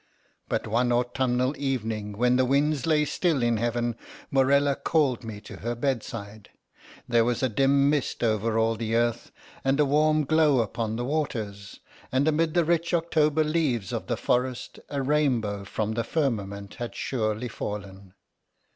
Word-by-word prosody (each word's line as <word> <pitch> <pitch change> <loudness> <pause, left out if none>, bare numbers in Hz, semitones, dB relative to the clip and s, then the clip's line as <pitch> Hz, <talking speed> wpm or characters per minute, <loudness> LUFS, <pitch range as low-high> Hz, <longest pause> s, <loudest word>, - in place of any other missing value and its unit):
But - - -1
one 120 +3 +1
autumnal 125 +1 +1
evening, 110 -6 -2
when 125 +4 +2
the 130 - +3
winds 140 +2 +1
lay 150 -2 +3
still 150 -2 0
in 120 -1 +2
heaven, 120 +1 -1 0.4
Morella 140 +1 +3
called 135 -7 +1
me 110 -2 -7
to - - -10
her 120 +2 -3
bedside. 115 -5 -4 0.6
There 120 -2 +4
was 120 +2 -1
a 130 - +2
dim 140 +4 +3
mist 145 -4 0
over 110 0 +1
all 115 0 +2
the 115 0 -2
earth, 120 0 0 0.3
and 135 +2 +1
a 150 - +5
warm 155 +2 +3
glow 150 -3 +4
upon 110 0 -3
the 120 +1 -3
waters, 110 -9 -3 0.3
and 130 +3 +2
amid 160 +1 +1
the 170 -2 +3
rich 170 +1 +1
October 160 -2 +2
leaves 150 - 0
of - - -4
the - - -1
forest, 125 0 -1
a 140 -2 -2
rainbow 125 -9 0
from 105 +2 -2
the 115 +1 -1
firmament 100 -9 -2
had 120 -1 -5
surely 110 -1 -2
fallen. 100 -3 -7
125 Hz, 160 wpm, -26 LUFS, 110-145 Hz, 0.6 s, a